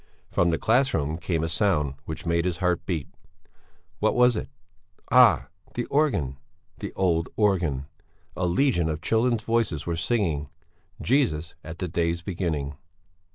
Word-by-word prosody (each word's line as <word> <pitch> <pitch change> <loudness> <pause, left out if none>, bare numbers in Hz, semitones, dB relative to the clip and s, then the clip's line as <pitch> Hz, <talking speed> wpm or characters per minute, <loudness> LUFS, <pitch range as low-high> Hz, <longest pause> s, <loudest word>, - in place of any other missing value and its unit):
From 85 - +2
the 80 - +1
class 130 +8 +2
room 75 +1 -1
came 85 -3 -1
a - - 0
sound 80 -4 +1
which 80 +4 -6
made 85 0 +1
his 90 -2 -1
heart 90 -2 0
beat 80 -6 -2 0.9
what - - +2
was 125 -1 +5
it? - - -4 0.6
Ah! 65 - +6 0.3
The 120 - -1
organ 120 - +1 0.4
the - - -5
old 85 -3 +1
organ! 85 -10 +1 0.5
a 90 - 0
legion 90 - +2
of 75 0 -3
children's 115 0 +2
voices 115 -10 0
were 85 - -1
singing 80 - 0 0.5
"Jesus, 95 - +1
at 80 +1 -8
the 90 - -3
day's 85 0 -1
beginning...." 80 -7 -3
85 Hz, 150 wpm, -26 LUFS, 80-110 Hz, 0.9 s, Ah